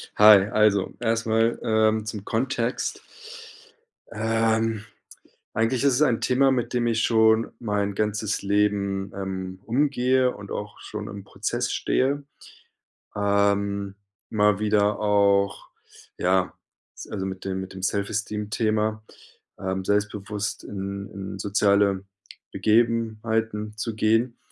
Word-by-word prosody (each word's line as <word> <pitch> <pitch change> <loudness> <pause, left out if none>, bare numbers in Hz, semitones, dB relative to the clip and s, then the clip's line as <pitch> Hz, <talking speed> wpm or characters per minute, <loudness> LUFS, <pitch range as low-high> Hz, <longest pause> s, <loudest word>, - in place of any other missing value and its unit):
Hi, 105 -2 +8
also, 105 -3 +2
erstmal, 115 0 +1
ähm, 110 -1 +2
zum 105 -2 -6
Kontext. 120 +1 -2 1.1
Ähm, 110 0 0 0.7
eigentlich 115 +4 +1
ist 140 -3 +4
es 135 - 0
ein 125 -6 +2
Thema, 135 +1 +3
mit 125 -2 -1
dem 120 -1 +1
ich 115 -1 +1
schon 110 0 +3
mein 105 -3 -1
ganzes 105 0 -1
Leben, 100 -1 0
ähm, 95 -1 -5
umgehe 130 0 +2
und 100 -1 -10
auch 105 0 -6
schon 105 -1 -6
im 100 -2 -8
Prozess 95 - -3
stehe. 140 +2 0 0.9
Ähm, 100 -1 +1 0.3
mal 105 -2 +2
wieder 105 -1 +2
auch 100 -1 +2 0.5
ja, 90 0 +1 0.4
s - - -9
also, 95 -2 -4
mit 95 0 -6
dem 95 -1 -2
mit 95 0 -8
dem 95 -1 -9
Self-Esteem 105 +1 -2
Thema, 110 0 0 0.6
ähm, 95 -1 -3
selbstbewusst 105 0 -2
in 100 0 -5
in 95 0 -7
soziale 100 -1 +2 0.5
Begebenheiten 110 0 0
zu 110 0 -3
gehen. 115 +3 +1
105 Hz, 115 wpm, -25 LUFS, 100-115 Hz, 1.1 s, Hi